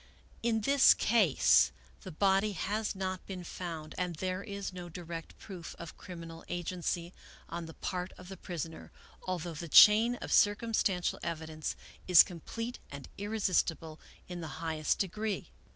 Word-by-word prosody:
" - - -28
In 225 -1 +1
this 275 +5 +6
case 210 - +4 0.3
the 185 - -8
body 195 +4 +2
has 205 +4 -2
not 185 -1 -3
been 185 -2 -6
found 165 -3 -6
and 180 -2 -1
there 185 +3 -3
is 200 -2 -5
no 175 -1 -7
direct 165 -1 -8
proof 180 -5 -9
of 170 -1 -9
criminal 165 -3 -9
agency 175 0 -3 0.4
on 170 0 -5
the 160 - -11
part 180 0 -4
of 180 - -12
the 190 - -7
pris 175 -4 -5
oner, 160 -1 -11 0.4
although 175 -2 -3
the 170 +2 -6
chain 220 +8 +8
of - - -4
circumstantial 205 -3 +2
evidence 160 -2 -4 0.3
is 180 -3 +9
com 175 -2 -9
plete 230 +8 -5
and 140 -1 -9
irresistible 185 -6 -1 0.3
in 180 -1 -6
the 160 - -5
highest 160 -2 -1
degree. 210 +2 -3
180 Hz, 155 wpm, -32 LUFS, 165-200 Hz, 0.4 s, is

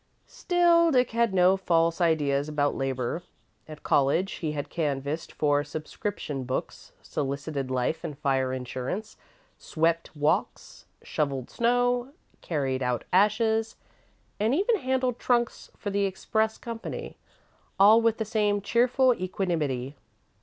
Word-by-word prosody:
Still, 345 -1 +3
Dick 250 -5 +2
had 230 -1 +2
no 185 0 +4
false 170 -2 +1
ideas 150 -3 +1
about 145 -1 +1
labour. 135 +3 -2 0.5
At 155 -1 -11
college 145 +7 +2
he 155 -3 -2
had 145 -1 -4
canvassed 145 -1 -3
for 145 -1 +1
subscription 150 -1 -5
books, 130 +1 -5
solicited 140 -1 -3
life 130 +6 -1
and 150 -4 -5
fire 135 -2 0
insurance, 130 - -5 0.4
swept 165 0 -1
walks, 150 0 -1 0.2
shovelled 140 -4 -2
snow, 245 +2 +1 0.3
carried 135 -5 -2
out 125 -1 -1
ashes, 220 +3 +2 0.6
and 220 +6 +2
even 415 +7 +2
handled 260 - -1
trunks 240 -1 0
for 205 - -4
the 200 0 +1
express 220 +3 -1
company, 230 -1 -6 0.6
all 215 +4 +7
with 230 -1 +2
the 220 - -2
same 210 -1 +1
cheerful 250 +5 +3
equanimity. 160 - -2
175 Hz, 125 wpm, -27 LUFS, 145-225 Hz, 0.6 s, all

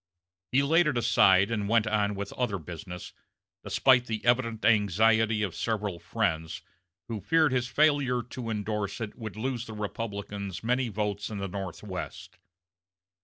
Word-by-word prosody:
He 135 +2 +4
laid 165 +3 +4
it 145 -5 0
aside 100 -3 +4
and 105 -3 -1
went 115 -1 +4
on 105 -1 +1
with 100 0 -5
other 120 -6 -1
business, 90 +2 -8 0.5
despite 125 -2 +3
the 110 0 -4
evident 115 -2 +1
anxiety 110 +1 +3
of 95 -5 -2
several 105 -4 -2
friends, 80 0 -2 0.4
who 110 -3 -4
feared 160 - +3
his 125 -1 0
failure 140 -2 +2
to 120 0 -7
indorse 105 -2 -2
it 110 -2 -5
would 110 -5 -7
lose 120 +1 -3
the 110 - -7
Republicans 100 -3 -5
many 125 +2 +1
votes 105 -1 -2
in 105 - -5
the 100 0 -3
Northwest. 95 0 -7
110 Hz, 150 wpm, -28 LUFS, 100-120 Hz, 0.5 s, He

